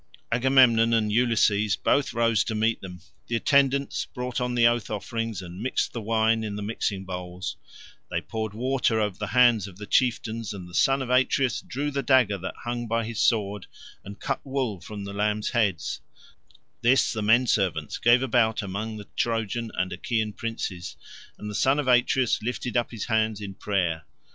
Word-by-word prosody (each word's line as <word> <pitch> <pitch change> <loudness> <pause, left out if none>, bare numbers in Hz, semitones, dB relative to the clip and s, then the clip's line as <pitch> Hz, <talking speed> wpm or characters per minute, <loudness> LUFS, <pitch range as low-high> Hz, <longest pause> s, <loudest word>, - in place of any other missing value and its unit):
Agamemnon 120 -2 +4
and 110 -2 +1
Ulysses 105 -3 +2
both 140 +6 +1
rose 115 -3 +2
to 110 - -3
meet 110 +1 +1
them. 90 -2 -9 0.3
The 120 - -1
attendants 140 +2 +2
brought 125 -1 -4
on 125 0 -1
the 120 -1 +4
oath 120 -1 +2
offerings 110 -1 -4
and 90 +2 -9
mixed 130 +3 -1
the 115 - -4
wine 110 +1 +1
in 105 -2 -4
the 105 - -5
mixing 100 -2 -3
bowls; 90 0 -5 0.5
they - - -1
poured 110 -2 -5
water 125 -1 +1
over 105 -3 -2
the 105 - -3
hands 120 -4 +4
of 95 -2 -12
the 105 - -7
chieftains, 115 -1 0
and 90 -3 -8
the 90 - -14
son 135 +7 +3
of 125 - -5
Atreus 130 0 +2
drew 145 +3 -3
the 140 0 -1
dagger 125 -6 +3
that 95 - -6
hung 120 0 -3
by 115 0 0
his 115 -1 -3
sword, 105 -3 +1 0.4
and 100 +1 -10
cut 135 - -3
wool 130 - -2
from 100 +4 -7
the 100 0 -6
lambs' 105 +1 -1
heads; 105 -9 0 0.8
this 125 +3 +3
the 110 - -3
men 115 +4 +4
servants 90 -9 0
gave 120 +2 +4
about 115 -3 +2
among 105 +3 -4
the 105 - -9
Trojan 115 0 -1
and 90 0 -1
Achaean 110 +3 -2
princes, 100 -6 -5 0.4
and 105 - -8
the 105 - -5
son 135 +6 +2
of 145 -3 -1
Atreus 125 0 +3
lifted 125 +1 -4
up 120 -1 +1
his 115 -4 -5
hands 110 -2 0
in 100 -2 -6
prayer. 90 -6 -2
110 Hz, 185 wpm, -26 LUFS, 100-120 Hz, 0.8 s, Agamemnon